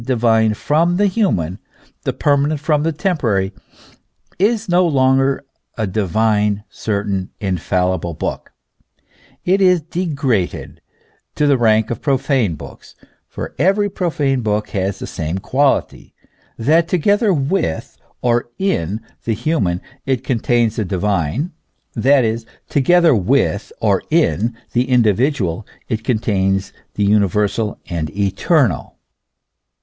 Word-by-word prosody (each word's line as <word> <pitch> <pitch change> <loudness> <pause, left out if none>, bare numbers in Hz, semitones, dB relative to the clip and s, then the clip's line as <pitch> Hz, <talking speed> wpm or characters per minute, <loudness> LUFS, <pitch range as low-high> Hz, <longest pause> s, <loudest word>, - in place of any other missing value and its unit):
209 130 +1 0
divine 110 -1 +3
from 165 +9 +1
the 205 - +3
human, 110 - 0 0.5
the - - +1
permanent 145 +1 +1
from 150 0 +1
the 165 +2 0
temporary, 120 - 0 0.9
is 220 +3 +1
no 180 0 +3
longer 135 -3 +2 0.3
a 110 - 0
divine, 105 +1 +1
certain, 100 -3 -2
infallible 90 -3 -1
book, - - -4 0.9
it 190 +2 +2
is 180 -2 +5
degraded 150 - -2 0.5
to 150 - +1
the 145 -1 +4
rank 110 -2 +2
of 115 - -4
profane 135 - +1
books; - - -12 0.3
for - - -7
every 195 +5 +3
profane 145 -8 0
book 105 -1 -1
has 95 0 -2
the - - -6
same 80 +1 -4
quality, 135 +8 0 0.4
that 160 +8 +3
together 205 +5 +2
with 140 - -1 0.3
or 120 0 +1
in 110 - -1 0.2
the 115 - 0
human 105 - 0 0.3
it 130 -2 0
contains 120 -2 +1
the 110 - +1
divine, 100 - -1 0.4
that 130 +2 +3
is, 115 +1 -1 0.2
together 170 +3 +4
with 110 0 +1
or 100 -4 +2
in 120 -8 +1 0.2
the 125 +2 +1
individual 115 - +2 0.3
it 110 -2 -2
con 125 -2 +1
tains 95 -3 0 0.2
the 105 - 0
universal 105 +1 +1
and 80 -3 -3
eternal. 105 - +1
120 Hz, 125 wpm, -18 LUFS, 100-150 Hz, 0.9 s, is